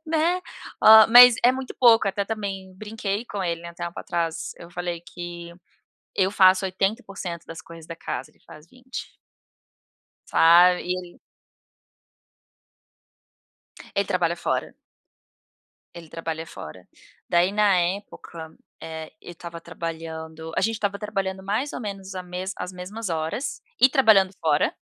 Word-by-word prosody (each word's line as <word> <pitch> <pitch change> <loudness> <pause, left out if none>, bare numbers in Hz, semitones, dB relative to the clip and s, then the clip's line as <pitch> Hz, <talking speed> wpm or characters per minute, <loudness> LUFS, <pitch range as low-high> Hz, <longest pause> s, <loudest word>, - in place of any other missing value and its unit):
Né. 330 +3 +1 0.4
Ó, 220 0 +9
mas 245 0 +10
é 250 - +7
muito 265 -1 -6
pouco, 230 -5 +6
até 200 +1 -2
também 195 -3 -5
brinquei 210 +1 -4
com 200 -3 -5
ele, 170 -1 -2
né, 170 - -8
um - - -26
tempo 170 0 -6
atrás. 165 -2 -3
Eu 170 0 -12
falei 175 -1 -4
que 175 0 -9 0.6
eu 190 0 +2
faço 185 -1 +5
80% 195 -3 -3
das 165 - -8
coisas 165 -1 -13
da 165 -1 -8
casa, 130 -4 -6
ele - - -32
faz 155 +2 -14
20. 255 +3 -9 1.1
Sabe, 175 +2 +5
e 180 - -2
ele 180 -1 -10 2.7
Ele 200 -1 +1
trabalha 175 -3 0
fora. - - -2 1.2
Ele 170 -2 -11
trabalha 165 0 -5
fora. 90 - -11 0.4
Daí, 175 +2 +3
na 205 -2 +3
época, 175 -3 -5 0.3
eh, 160 -1 -8
eu 175 - -10
estava 170 0 -9
trabalhando, 160 -1 -7
a - - +2
gente 225 0 0
estava 200 -2 -2
trabalhando 195 -3 -3
mais 215 +9 -2
ou - - -5
menos 195 -3 -7
a 185 - -5
mesma 180 +2 -5
as 180 +1 -5
mesmas 190 +4 -6
horas 160 - -3 0.2
e 260 - +8
trabalhando 220 -9 +4
fora, 150 -2 +1
185 Hz, 140 wpm, -24 LUFS, 170-205 Hz, 2.7 s, mas